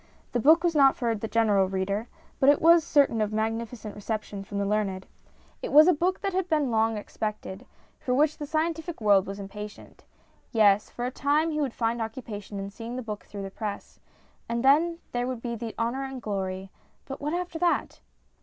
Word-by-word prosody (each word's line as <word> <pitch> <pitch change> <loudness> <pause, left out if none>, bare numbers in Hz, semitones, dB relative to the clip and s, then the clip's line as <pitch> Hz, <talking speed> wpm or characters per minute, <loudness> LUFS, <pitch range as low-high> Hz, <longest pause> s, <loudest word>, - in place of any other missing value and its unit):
The 245 - 0
book 315 +7 +5
was 345 -1 +2
not 275 -3 +5
for 235 -2 0
the 225 0 -4
general 210 -4 +2
reader, 195 +4 -2 0.3
but 270 - +5
it 285 - +5
was 335 0 +6
certain 280 -8 +3
of 210 0 0
a - - -4
magni 225 +1 0
ficent 220 -3 -9
reception 210 -1 -5
from 200 +1 -6
the 200 - 0
learned. 195 -2 -1 0.6
It - - -4
was 305 +3 +8
a 365 - +6
book 360 +5 0
that 390 - -2
had 370 -1 -1
been 300 -5 +1
long 225 0 +2
expected, 210 +1 -5 0.3
for 250 - -1
which 300 +2 +3
the 295 - -5
scientific 325 +2 -2
world 205 -3 +4
was 195 +1 -6
impatient. 210 +1 -9 0.5
Yes, 210 -2 +4
for 240 - -5
a 250 - -2
time 295 +5 +1
he 305 0 -1
would 270 -5 -2
find 230 0 -1
occupation 220 -3 -6
in 195 0 -5
seeing 230 +3 -7
the 255 - -4
book 210 -2 -6
through 200 -1 -7
the 195 - -6
press; 210 0 -6 0.5
and 235 +2 -1
then 325 +5 +4
there 245 0 -1
would 255 -3 -5
be 235 -1 -3
the 230 -1 -6
honour 240 +4 -1
and 265 -1 -6
glory; 190 -3 -4 0.3
but 270 - -7
what 295 +2 -2
after 350 -2 -4
that 350 0 0
230 Hz, 210 wpm, -27 LUFS, 210-290 Hz, 0.6 s, was